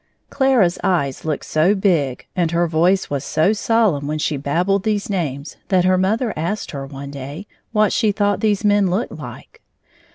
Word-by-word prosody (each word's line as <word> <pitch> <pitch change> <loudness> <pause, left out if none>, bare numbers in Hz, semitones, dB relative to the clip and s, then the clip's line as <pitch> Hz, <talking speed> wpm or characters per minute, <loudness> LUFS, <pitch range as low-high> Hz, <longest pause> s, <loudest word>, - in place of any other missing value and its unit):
Clara's 250 -10 +2
eyes 140 -8 0
looked 155 -3 -2
so 165 +7 +2
big, 165 -10 0
and 175 -3 +1
her 170 +1 +1
voice 170 +3 +1
was 140 -1 -2
so 155 +8 +2
solemn 210 -10 +1
when 155 +1 -2
she 150 0 -1
babbled 175 +8 0
these 210 0 -1
names 150 -6 -3
that 185 -2 +2
her 185 0 +4
mother 215 +5 0
asked 170 +7 -3
her 140 -2 -6
one 140 0 -8
day 140 +7 -7 0.3
what 215 -2 +2
she 220 -3 +2
thought 205 0 0
these 210 -1 0
men 205 -2 +3
looked 200 +8 -1
like. - - -10
180 Hz, 175 wpm, -20 LUFS, 150-205 Hz, 0.3 s, her